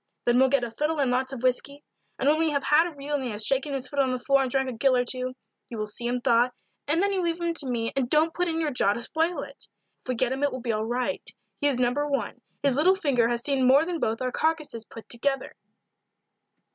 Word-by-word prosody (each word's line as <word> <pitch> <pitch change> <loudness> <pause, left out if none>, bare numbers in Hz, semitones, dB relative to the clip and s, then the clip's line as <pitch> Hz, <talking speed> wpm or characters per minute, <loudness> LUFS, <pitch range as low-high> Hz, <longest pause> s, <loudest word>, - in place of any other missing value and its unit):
Then 240 +1 +4
we'll 265 0 +5
get 275 -2 +2
a 235 - -3
fiddle 300 +7 -1
and 265 -3 +2
lots 260 +1 0
of 260 -2 -7
whisky; 275 +3 0 0.3
and 270 - -1
when 305 +2 +4
we 325 0 +2
have 280 -2 -1
had 315 +3 +4
a 335 - -9
reel 285 +1 -6
and 285 -2 0
he 250 - -3
has 210 -1 -3
shaken 275 +2 +1
his 265 -2 -3
foot 285 - -4
on 265 -2 +3
the 255 - -1
floor 275 +2 +2
and 265 - -1
drank 265 +1 0
a 255 - -3
gill 255 +3 +2
or 245 - +1
two, 255 +1 -2 0.3
you 235 - -6
will 215 - -2
see 225 +3 -2
him 245 +1 -1
thaw, 240 +1 +3 0.4
and 325 +5 +2
then 400 0 +1
you 380 - 0
leave 340 -1 -1
him 340 -1 -1
to 295 -4 -4
me 230 -2 -1
and 260 -3 0
don't 315 +3 +3
put 355 0 0
in 325 -1 -1
your 310 -2 0
jaw 205 -6 +2
to 235 - -5
spoil 320 +5 -1
it. 280 0 -11 0.4
If - - -14
we 255 - 0
get 245 +1 +1
him 265 +1 -3
it 285 - +2
will 255 - -5
be 235 -1 -2
all 215 0 -1
right 250 +4 -2 0.4
he 290 - +2
is 270 -3 +1
No. 245 -1 +2
1; 290 0 -2 0.2
his 275 -2 +2
little 365 +6 +5
finger 270 -10 +1
has 240 0 -2
seen 270 -3 +2
more 275 +5 +6
than 340 -1 -3
both 225 0 -1
our 255 - -1
carcasses 305 -8 -1
put 225 - -12
together." 270 +3 -1
270 Hz, 275 wpm, -26 LUFS, 245-295 Hz, 0.4 s, more